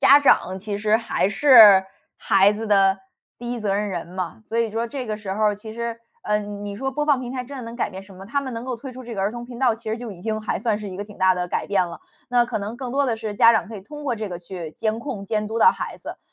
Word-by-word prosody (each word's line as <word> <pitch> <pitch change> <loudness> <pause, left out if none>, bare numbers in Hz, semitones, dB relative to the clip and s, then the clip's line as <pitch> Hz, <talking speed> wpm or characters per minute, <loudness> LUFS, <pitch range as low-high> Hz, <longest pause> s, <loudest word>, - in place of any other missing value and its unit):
家 280 - +8
长， 190 -9 +3
其 205 +1 -4
实 215 +1 +3
还 210 -4 0
是 215 -5 +8 0.3
孩 195 +1 +4
子 220 +2 -5
的 195 -2 +4 0.4
第 240 0 -5
一 240 - -4
责 200 -2 0
任 210 +1 -1
人 175 -4 -4
嘛。 180 +2 -5
所 225 +2 -3
以 230 - +3
就 215 - -8
说 235 - 0
这 255 +1 -5
个 215 -1 -3
时 205 -3 -5
候 215 +2 0
儿 210 -1 +2
其 215 +1 -9
实， 235 0 -4 0.3
嗯， 205 -1 -2
你 200 0 -5
说 270 +5 -2
播 295 +3 -2
放 290 -3 +4
平 250 -1 -6
台 255 -1 -3
真 280 +3 -9
的 255 - -6
能 230 +1 -8
改 - - 0
变 190 -1 -9
什 195 0 -15
么？ 190 +1 -11
他 280 +6 -1
们 260 -2 -5
能 230 0 -5
够 255 -2 -3
推 260 +3 -9
出 255 +1 -9
这 235 -1 -7
个 195 - -2
儿 200 - +1
童 240 0 -7
频 240 -1 -9
道， 245 -3 +3
其 225 0 -9
实 220 - -1
就 235 -3 -7
已 175 - -13
经 215 +2 -3
还 215 - -2
算 220 -4 0
是 210 -1 -6
一 185 - -8
个 - - -2
挺 210 0 -14
大 185 0 +4
的 180 -1 -3
改 - - -2
变 190 -3 +1
了。 170 - -9 0.3
那 245 -1 +3
可 235 -2 -3
能 210 +3 -5
更 250 -1 -5
多 280 +1 +2
的 235 -3 0
是 220 -2 -5
家 230 +3 +7
长 220 - 0
可 220 - -7
以 - - -8
通 295 +10 -10
过 250 -5 -1
这 215 -1 -4
个， 175 -2 -6
去 175 -2 -7
监 220 0 -2
控 235 -6 -5
监 210 +1 -2
督 225 - -2
到 465 - +7
孩 - - -5
子。 - - -9
220 Hz, 335 characters per minute, -23 LUFS, 200-240 Hz, 0.4 s, 家